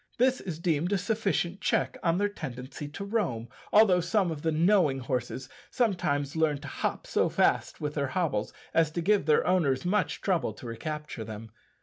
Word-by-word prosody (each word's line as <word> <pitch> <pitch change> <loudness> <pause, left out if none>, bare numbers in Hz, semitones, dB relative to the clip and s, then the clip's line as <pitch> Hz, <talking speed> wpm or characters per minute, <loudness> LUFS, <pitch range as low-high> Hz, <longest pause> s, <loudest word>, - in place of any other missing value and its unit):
This 255 +1 +3
is 175 -5 -5
deemed 170 +1 0
a - - +3
sufficient 195 -2 -1
check - - +1
on 170 -1 +2
their 205 +1 +2
tendency 135 -6 -7
to 155 +7 -7
roam, 185 - -1 0.2
although 205 -4 +6
some 180 +1 +1
of 150 -2 -5
the 160 - +1
knowing 165 -3 +3
horses 125 0 -3 0.2
sometimes 165 - 0
learn 160 -2 +2
to 145 - -8
hop - - -3
so - - +1
fast - - +1
with 150 0 -3
their 140 -2 -1
hobbles 135 - -1 0.2
as 165 -2 +4
to 170 - -1
give 205 -4 +2
their 155 - +4
owners 165 -6 +2
much 200 +2 +1
trouble 185 -4 0
to 130 - -12
recapture 150 +2 -5
them. 110 0 -8
160 Hz, 185 wpm, -29 LUFS, 140-190 Hz, 0.2 s, although